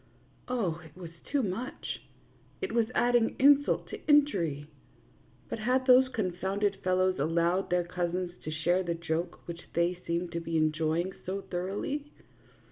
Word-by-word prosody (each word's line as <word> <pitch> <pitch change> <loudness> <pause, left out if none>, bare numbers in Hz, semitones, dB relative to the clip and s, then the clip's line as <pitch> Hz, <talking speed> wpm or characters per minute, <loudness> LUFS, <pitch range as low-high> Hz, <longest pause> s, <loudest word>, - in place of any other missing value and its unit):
Oh, 190 -10 -1
it 160 +2 -15
was 170 -3 -8 0.2
too 280 -2 +2
much; 220 +6 -4 0.6
it 385 - -3
was 230 -2 +2
adding 240 -1 +3
insult 285 +1 +4
to - - -6
injury. 190 - +3 0.8
But - - -4
had 255 +4 +1
those 255 0 +7
confounded 195 -2 -1
fellows 185 -1 +2
al 145 - +2
lowed 170 +3 +1
their 180 0 +2
cousins 180 0 -2
to - - -4
share 170 +4 +1
the 170 -2 -2
joke 165 +1 -3
which 170 0 -6
they 170 +1 +2
seemed 170 +1 -1
to 170 - -2
be 165 -1 -2
enjoying 160 +3 +1
so 195 +2 -3
thoroughly 200 +12 -3
185 Hz, 150 wpm, -30 LUFS, 170-230 Hz, 0.8 s, those